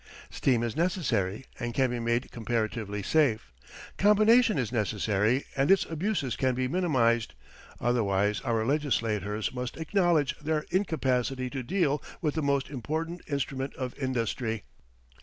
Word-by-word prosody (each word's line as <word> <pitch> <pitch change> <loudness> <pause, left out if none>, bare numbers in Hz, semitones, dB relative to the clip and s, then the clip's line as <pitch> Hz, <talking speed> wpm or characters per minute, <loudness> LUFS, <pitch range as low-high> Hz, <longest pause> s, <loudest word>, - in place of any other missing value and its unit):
Steam 120 -4 +1
is 115 -2 -2
necessary 135 - 0
and 120 0 -3
can 130 -2 +2
be 120 - -2
made 120 +2 -1
comparatively 110 -3 -2
safe. 110 - +1 0.5
Combination 215 +1 +5
is 125 -5 -1
necessary 110 +2 +1
and 135 0 +1
its 195 -1 +5
abuses 160 - -1
can 130 -1 +1
be 130 0 0
minimized; 130 -9 +1 0.4
otherwise 105 -4 +1
our 115 -3 0
legislators 110 - 0
must 125 -1 -4
acknowledge 165 -3 +2
their 155 0 -1
incapacity 130 -8 0
to 135 - -3
deal 150 0 0 0.2
with 150 -4 0
the 160 - -1
most 140 -1 +1
important 160 +6 -3
instrument 135 -1 -3
of 130 -2 -4
industry. 115 -4 -2
130 Hz, 135 wpm, -28 LUFS, 115-155 Hz, 0.5 s, Combination